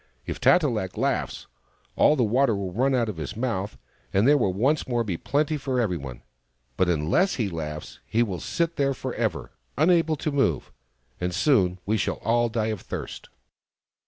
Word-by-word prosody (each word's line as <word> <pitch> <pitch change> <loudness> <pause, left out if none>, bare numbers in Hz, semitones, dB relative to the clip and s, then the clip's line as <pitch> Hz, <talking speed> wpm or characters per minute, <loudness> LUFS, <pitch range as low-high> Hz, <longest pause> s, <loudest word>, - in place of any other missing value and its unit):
If - - -5
Tat 180 -1 +5
e - - +2
lak 105 -8 -3
laughs, - - -1 0.5
all 150 - +5
the 130 - +2
water 120 +1 +2
will 95 -2 -4
run 130 +5 +2
out 120 -2 +1
of 105 -6 -5
his 80 +5 -5
mouth, 110 -5 -2 0.3
and 100 +5 +3
there 145 - +6
will 115 -9 +2
once 130 +11 +1
more 120 -2 0
be 100 -6 -2
plenty 150 - 0
for 135 -3 -2
every 105 -7 +1
one. 65 -5 -8 0.5
But 90 +5 +2
unless 85 - +2
he 110 -6 -1
laughs 75 -3 -6
he 115 +2 +2
will 95 -6 -4
sit 170 - -2
there 140 -1 +1
for - - -5
ever, - - -2 0.3
unable 165 0 +3
to 155 +1 -3
move; 140 -1 0 0.5
and 90 -1 -2
soon 95 - +3
we 110 +2 +1
shall 95 - -1
all 120 +1 +2
die 110 -1 -1
of 100 - -7
thirst." - - -7
115 Hz, 190 wpm, -25 LUFS, 95-140 Hz, 0.5 s, there